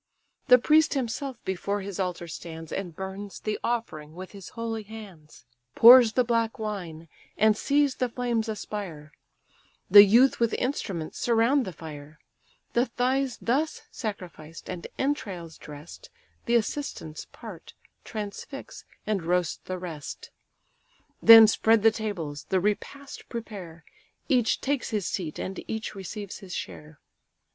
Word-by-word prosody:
The 250 -2 +9
priest 305 +5 +4
himself 265 0 -3
before 200 +2 -2
his 195 0 -6
altar 180 -2 -2
stands, 165 0 -8
And 180 -4 -4
burns 190 +2 -7
the 215 -1 -2
offering 155 -10 -3
with 185 +1 -8
his 195 -3 -10
holy 225 -1 -3
hands. 200 - -12 0.3
Pours 235 -1 +9
the 250 - +3
black 230 -1 0
wine, 180 -7 -5 0.3
and 215 0 +4
sees 285 +3 +2
the 250 -1 -1
flames 235 -2 -1
aspire; 195 -8 -6 0.8
The 205 +1 +12
youth 235 +7 +5
with 235 -1 +2
instruments 190 - -3
surround 240 +3 +3
the 185 - -5
fire: 150 -2 -10 0.6
The 240 +2 +2
thighs 255 +2 0
thus 285 +7 -1
sacrificed, 175 -8 -7
and 180 -2 -6
entrails 195 - -3
dress'd, 150 +2 -11 0.4
The 235 - +3
assistants 225 - -2
part, - - -11 0.3
transfix, 225 - -7 0.2
and 210 -3 0
roast 175 0 -1
the 185 - -4
rest: 165 -5 -8 0.9
Then 225 0 +11
spread 220 0 +3
the 225 - +7
tables, 180 -10 -5
the 190 - +1
repast 210 +8 -4
prepare; 195 -8 -8 0.4
Each 250 -6 +2
takes 280 -1 -1
his 210 -6 -2
seat, 165 -4 -3
and 190 - -5
each 220 0 -4
receives 200 +1 -7
his 185 -3 -8
share. 150 0 -8
210 Hz, 135 wpm, -27 LUFS, 175-235 Hz, 0.9 s, The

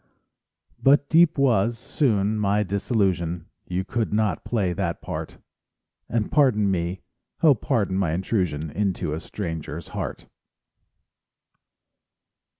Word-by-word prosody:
But 140 +1 +4
deep 165 0 +5
was, 120 -4 +2
soon, 110 -5 0
my 105 0 +2
disillusion, 95 -4 0 0.2
You 90 +1 -1
could 115 +2 -2
not 105 0 0
play 100 -7 0
that 85 -3 -2
part; - - -6 0.7
And 115 -2 -1
pardon 110 -9 +3
me, 85 -2 -2 0.4
oh, 155 -3 +8
pardon 105 -6 -1
my 85 -5 +1
intrusion, 85 -5 -1
Into 95 -6 -1
a 80 - -3
stranger's 80 -4 -6
heart. - - -5
100 Hz, 110 wpm, -24 LUFS, 90-115 Hz, 0.7 s, oh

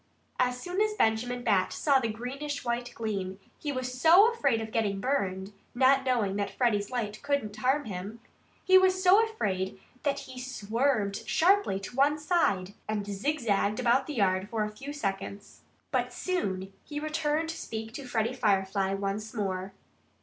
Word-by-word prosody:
As 250 0 +1
soon 360 +7 -2
as 430 0 +1
Benjamin 245 - +1
Bat 200 -5 +2
saw 280 -3 +3
the 235 - -1
greenish 265 +6 -5
white 240 0 -2
gleam 195 -4 -3 0.2
he 295 - -3
was 255 -1 -4
so 380 +8 +7
afraid 275 - +1
of 220 0 -5
getting 205 -4 0
burned 195 -6 -1 0.2
not 265 +1 +4
knowing 230 -7 +1
that 200 -1 -1
Freddie's 205 -1 0
light 215 -4 -3
could 285 0 0
not 210 -1 -7
harm 265 +6 +1
him 200 +2 -6 0.5
he 375 0 +8
was 370 0 +2
so 390 +4 +7
afraid 195 - -2 0.2
that 280 -1 -1
he 255 -1 -9
swerved 230 -3 -1
sharply 370 - +3
to 195 - -8
one 285 +3 +3
side 295 - +1
and 210 -2 -2
zigzagged 210 -1 0
about 250 +2 +3
the 300 - -5
yard 190 -2 +1
for 225 -3 -1
a 210 - -3
few 275 +6 -7
seconds. 200 -6 -5 0.3
But - - +2
he - - -15
soon 195 - -2 0.2
returned 305 +1 -1
to 325 - -4
speak 220 0 -6
to 275 -1 -7
Freddie 230 0 0
Firefly 195 -4 +1
once 200 +3 -3
more. 190 -2 -2
235 Hz, 170 wpm, -29 LUFS, 200-285 Hz, 0.5 s, he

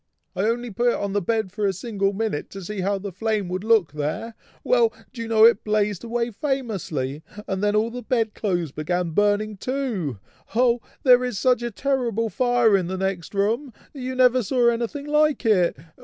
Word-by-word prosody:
"I 195 - 0
only 240 0 -2
put 240 +4 0
it 240 - +3
on 200 -1 -3
the 205 - +1
bed 220 0 -1
for 205 +1 -1
a 195 - +1
single 200 0 -1
minute, 205 -6 -3
to 195 -1 -8
see 210 +3 -5
how 200 +2 0
the 195 0 -6
flame 215 +1 -1
would 185 +2 -3
look 220 -7 +3
there, 155 +11 -3 0.3
well! 475 -2 +3 0.2
do 235 - -7
you 230 - -4
know 220 -1 +6
it 230 -3 +5
blazed 210 -2 0
away 235 0 -2
famously, 195 - -3 0.3
and 190 +1 -2
then 210 0 +2
all 220 +2 +1
the 250 +1 -6
bed 230 -4 0
clothes 175 -7 -1
began 170 +3 -2
burning 205 +3 +1
too! 225 - -2 0.4
Oh! 240 0 +3 0.2
there 250 -2 +6
is 250 -5 -2
such 250 0 +2
a 240 - -2
terrible 235 -3 -1
fire 245 -4 +3
in 185 -3 0
the 190 +1 -3
next 190 -1 -3
room! 225 +7 0 0.2
you 260 -2 -5
never 255 0 +4
saw 240 +2 +2
anything 235 +5 -2
like 300 -2 +2
it! 185 -9 +3
220 Hz, 200 wpm, -23 LUFS, 195-245 Hz, 0.4 s, know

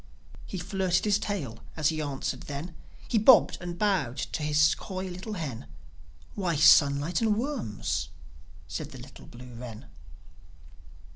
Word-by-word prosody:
He 190 - -5
flirted 185 0 0
his 210 -1 +3
tail 145 - -4 0.2
as 155 -2 +3
he 155 -1 -2
answered 135 -3 -3
then, 145 +5 -5 0.3
He 230 - +2
bobbed 230 +3 +6
and 175 -1 -4
he - - -11
bowed 175 - +1
to 145 - -3
his 150 0 +4
coy 185 0 -6
little 185 +4 -6
hen: 140 - -5 0.7
"Why, 180 -5 -1
sunlight 145 +2 +5
and 215 -2 +2
worms!" 105 - -2 0.6
said 75 - -5
the - - -11
little - - -12
blue 125 +1 -12
wren. 115 -2 -9
155 Hz, 145 wpm, -28 LUFS, 135-190 Hz, 0.7 s, bobbed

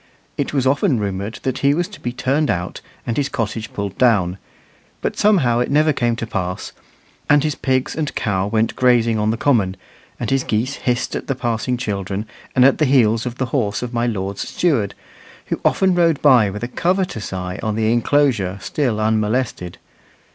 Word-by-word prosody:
It - - -2
was 135 -3 0
often 140 - +2
rumoured 100 +1 -3
that 130 - -2
he 140 +1 +3
was 175 +2 0
to 205 - -12
be 120 - -3
turned 140 +4 0
out 90 0 -2 0.2
and 115 - -2
his 140 -1 0
cottage 110 -3 -3
pulled 100 -2 -5
down, 95 -7 +3 0.6
but - - -2
somehow 150 - +3
it 125 - 0
never 150 +2 +3
came 120 -3 0
to 115 - -4
pass; 90 -5 -4 0.6
and 145 -1 +5
his 155 -1 0
pigs 130 0 0
and 155 -3 -3
cow 95 -2 0
went 110 +1 0
grazing 120 -3 +3
on 105 0 +1
the 115 - 0
common, 105 -9 +1 0.4
and - - -3
his 135 -1 +2
geese 115 +5 -1
hissed 125 0 -1
at - - -5
the 135 - -1
passing 120 +1 -1
children 100 -3 -3 0.3
and 125 - +6
at 135 - +4
the 155 - +4
heels 120 -4 +3
of 125 0 -5
the 130 - 0
horse 110 -5 0
of 125 0 -5
my 120 0 0
lord's 100 -3 -3
steward, 130 - 0 0.5
who - - -3
often 190 -1 +3
rode 165 -4 +3
by 125 -8 +6
with 105 +3 -6
a - - -1
covetous 180 - -1
eye 90 -1 -4
on 110 -1 -1
the 110 +1 +2
inclosure 120 -6 +1
still 125 -5 -1
unmolested. 110 -3 -1
120 Hz, 190 wpm, -20 LUFS, 105-135 Hz, 0.6 s, and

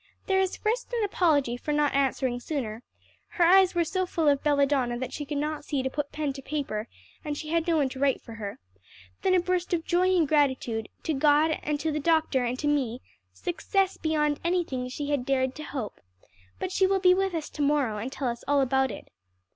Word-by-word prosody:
"There 385 -1 +2
is 380 -1 0
first 475 +4 -1
an 465 -2 +1
apology 305 -11 +2
for 300 - -4
not 295 -1 +2
answering 265 -2 +1
sooner 240 -5 -4 0.6
(her 350 - +4
eyes 375 +1 +6
were 345 - +3
so 370 +3 -1
full 325 -3 0
of 280 -1 +4
belladonna 280 -4 +2
that 255 +1 -5
she 295 - -4
could 290 +1 -3
not 300 +1 -2
see 280 -3 -2
to 265 - -2
put 290 0 -3
pen 295 -2 -2
to 270 - -8
paper, 265 -7 -3 0.4
and 295 -2 -3
she 305 - -6
had 335 +1 0
no 330 -2 +3
one 285 -3 +2
to 260 - -8
write 275 -1 +2
for 230 - -11
her), 210 -3 -6 0.6
then 370 - +3
a - - +5
burst 360 0 0
of 330 - -4
joy 365 +1 +2
and 325 -3 +3
gratitude 260 -7 +1
to 320 - -1
God, 300 +2 +3 0.2
to 315 +2 -1
the 305 - -1
doctor 315 -4 +2
and 245 +1 -1
to 295 - -2
me, 260 -5 0 0.3
'success 385 +2 -1
beyond 300 -2 0
anything 335 -8 -1
she 290 +3 -4
had 285 -4 0
dared 260 -1 0
to 305 - -8
hope,' 265 -8 -6 0.6
but 370 - -4
she 380 0 +3
will 390 0 +2
be 365 -1 +6
with 385 -1 0
us 315 -2 -3
to 300 - -5
morrow, 280 -7 +1
and 245 +5 -4
tell 270 -1 -3
us 235 -1 -3
all 285 0 +3
about 265 0 +2
it." - - -8
295 Hz, 220 wpm, -27 LUFS, 265-335 Hz, 0.6 s, eyes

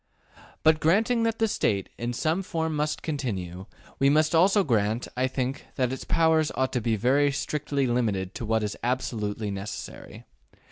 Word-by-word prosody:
But 160 0 +5
granting 220 +10 +3
that 225 0 0
the 225 - +2
State, 100 - 0
in 120 +1 -2
some 155 +9 0
form, 160 -4 -2
must 150 +1 -1
continue, 95 - -4 0.3
we 135 +1 +4
must 155 +2 +3
also 195 +5 +5
grant, 110 - 0
I 130 +1 +1
think, 130 +1 -3
that 130 -1 0
its 130 - -6
powers 160 -2 +3
ought 130 0 0
to 125 - 0
be 115 0 +1
very 135 +7 +3
strictly 140 0 -1
limited 105 -6 0
to 115 - -5
what 110 0 +1
is 105 -1 -2
absolutely 110 -4 -2
necessary. 100 +2 -7
130 Hz, 170 wpm, -26 LUFS, 110-155 Hz, 0.3 s, But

